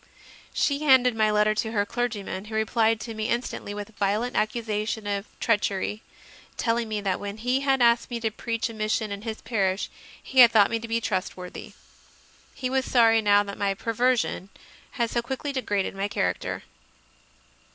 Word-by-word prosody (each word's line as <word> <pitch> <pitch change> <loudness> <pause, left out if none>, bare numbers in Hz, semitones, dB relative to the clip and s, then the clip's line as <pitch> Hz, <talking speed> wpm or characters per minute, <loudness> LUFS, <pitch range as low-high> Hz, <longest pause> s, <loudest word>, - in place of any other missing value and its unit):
She 280 -1 +1
handed 260 -5 +5
my 215 -1 +3
letter 210 0 +3
to 220 +1 -2
her 205 -2 +1
clergyman, 210 -4 -3
who 220 0 -7
replied 220 0 +2
to 230 - -6
me 220 +1 -3
instantly 235 -3 -2
with 205 0 -5
a - - -20
violent 210 +5 -1
accusation 215 -1 -1
of 200 0 -2
treach 220 -3 +2
ery, 205 +2 -3 0.6
telling 230 -1 0
me 215 -1 -2
that 195 -2 -1
when 205 +1 -6
he 250 +4 0
had 270 -2 +2
asked 235 0 +3
me 240 -1 -3
to 225 -1 0
preach 230 +2 -2
a 230 - -8
mission 215 0 -1
in 200 0 -5
his 220 0 -5
parish 200 -4 -1 0.3
he 265 - 0
had 240 -2 +10
thought 215 -2 +5
me 230 - 0
to 230 - -7
be 230 0 0
trustworthy; 185 -3 -4 0.8
he 255 - -3
was 265 +1 +1
sorry 225 -3 +4
now 205 -1 +4
that 200 -1 -8
my 200 -1 +1
"per 230 +4 -3
version" 240 -5 +1 0.4
had 235 -4 -1
so 235 - 0
quickly 265 +4 -4
degraded 205 -8 -1
my 195 +1 -1
character. - - -2
220 Hz, 185 wpm, -26 LUFS, 205-235 Hz, 0.8 s, had